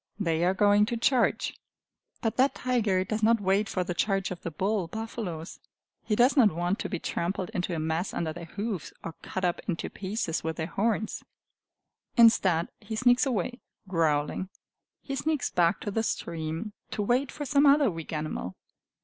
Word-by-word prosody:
They 165 -4 +1
are 185 +2 +2
going 205 +1 +4
to 235 - -2
charge! 240 0 +2 0.7
But 225 - 0
that 265 +2 +3
tiger 220 -7 +1
does 215 +3 -3
not 230 +1 +4
wait 200 +2 +1
for 185 - 0
the 180 - -3
charge 195 +1 0
of 180 - -6
the - - -4
bull 190 +3 -1
buffaloes. 195 -5 -5 0.4
He 210 - 0
does 245 +5 +4
not 235 -8 +6
want 175 +4 -1
to - - -3
be 180 - -2
trampled 180 +4 -2
into 180 -3 -1
a - - -2
mess 160 +4 -1
under 160 -2 -2
their 170 +1 -8
hoofs, 200 0 -4
or 165 - -5
cut 185 -1 -3
up 175 - 0
into 175 -4 -2
pieces 190 -4 -3
with 160 0 -2
their 160 - -2
horns. 215 +4 -1 0.9
Instead, 190 -8 +5
he 220 +1 -6
sneaks 245 +4 +4
away, 245 +1 -1 0.3
growling. 160 0 0 0.5
He 275 - -4
sneaks 305 -1 -1
back 170 -1 +2
to 205 - -3
the 225 - 0
stream, 165 0 -3 0.2
to 210 - -2
wait 250 +5 +1
for 295 - -5
some 285 +1 +4
other 280 -4 +5
weak 165 -2 -7
animal. 155 - -3
195 Hz, 180 wpm, -28 LUFS, 170-225 Hz, 0.9 s, not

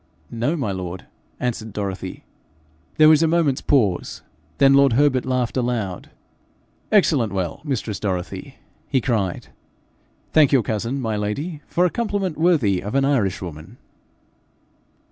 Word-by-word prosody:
'No, 120 +7 -1
my 125 -9 -2
lord,' 95 -1 -6 0.3
answered 110 -3 -3
Dorothy. 95 -2 -5 0.7
There 155 -1 +7
was 155 0 +6
a 165 - +4
moment's 160 -5 +1
pause; 105 -11 0 0.3
then 135 0 +5
lord 140 -2 +5
Herbert 130 -1 +2
laughed 130 -1 -1
aloud. 115 -7 -2 0.8
'Excellent 150 - +3
well, 95 -4 -3
mistress 125 -8 -3
Dorothy!' 90 -4 -4 0.3
he 135 - +1
cried. 110 -8 -2 0.8
'Thank 155 -3 +5
your 135 -5 +4
cousin, 115 +6 -2
my 110 -4 -2
lady, 140 +11 -3
for 180 - +1
a 180 - +1
compliment 205 -7 -2
worthy 135 - +2
of 105 +6 -5
an 135 0 +3
Irishwoman.' 95 - -2
125 Hz, 130 wpm, -22 LUFS, 100-145 Hz, 0.8 s, There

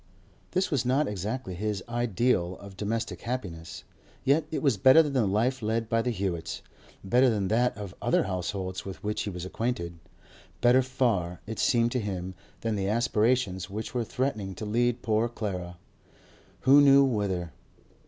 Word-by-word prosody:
This 185 0 +1
was 140 -5 +1
not 130 +4 +2
exactly 105 +1 -4
his 105 +1 -3
ideal 120 -5 0
of 100 -1 -11
domestic 110 +3 -3
happiness, 90 -10 -5 0.4
yet 145 +3 +3
it 160 - -3
was 135 -6 +3
better 130 +10 +7
than 145 -2 -3
the 125 -6 +2
life 120 +7 +1
led 110 +1 -1
by 115 0 +2
the 125 - -1
Hewetts—better 100 +4 -1
than 100 -5 0
that 120 0 +2
of 100 -3 -7
other - - +2
households 95 0 -3
with 95 -1 -8
which 105 +1 -1
he - - -3
was 90 -2 -6
acquainted—better 115 +5 -1
far, 115 -9 0
it 110 +1 -6
seemed 120 -1 +3
to 125 - 0
him, 95 -4 -4 0.3
than 115 -1 -1
the 95 -1 -1
aspirations 110 -3 +1
which 105 +3 -5
were 120 -2 0
threatening 110 -6 -2
to 110 - -6
lead 120 +3 0
poor 110 +1 +1
Clara—who 100 +7 -1
knew 140 0 +7
whither? 100 - -1
110 Hz, 155 wpm, -28 LUFS, 95-125 Hz, 0.4 s, better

